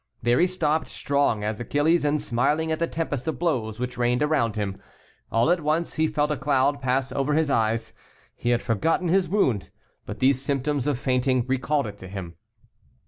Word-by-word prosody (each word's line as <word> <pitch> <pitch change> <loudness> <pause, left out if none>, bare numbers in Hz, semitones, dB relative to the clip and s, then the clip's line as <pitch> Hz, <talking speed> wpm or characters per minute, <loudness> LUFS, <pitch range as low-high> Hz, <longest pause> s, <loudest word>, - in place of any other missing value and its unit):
There 120 +1 +3
he 180 - +4
stopped, 160 -4 0
strong 140 -7 0
as 105 0 -2
Achilles, 145 +8 +1
and 150 +1 +1
smiling 150 +4 0
at 160 - -1
the 170 - +1
tempest 160 -5 -3
of 160 - -1
blows 120 -10 -1
which 125 0 -4
rained 125 +3 +2
around 135 -8 +1
him. 100 -2 -3 0.5
All 115 +8 +3
at 175 -1 +2
once 155 +3 0
he 160 +1 +1
felt 150 -1 0
a 150 - -1
cloud 140 +1 +1
pass 130 0 0
over 145 +1 0
his 155 -2 +1
eyes. 115 -1 0 0.4
He 120 - -2
had 120 -1 +1
forgotten 165 - 0
his 185 -1 +2
wound, 135 - +1 0.4
but - - -5
these 130 0 +3
symptoms 140 0 -1
of 145 -4 +1
fainting 130 -1 +1
recalled 135 +2 0
it 105 -1 -8
to 95 - -9
him. 95 -3 -7
140 Hz, 195 wpm, -25 LUFS, 120-155 Hz, 0.5 s, he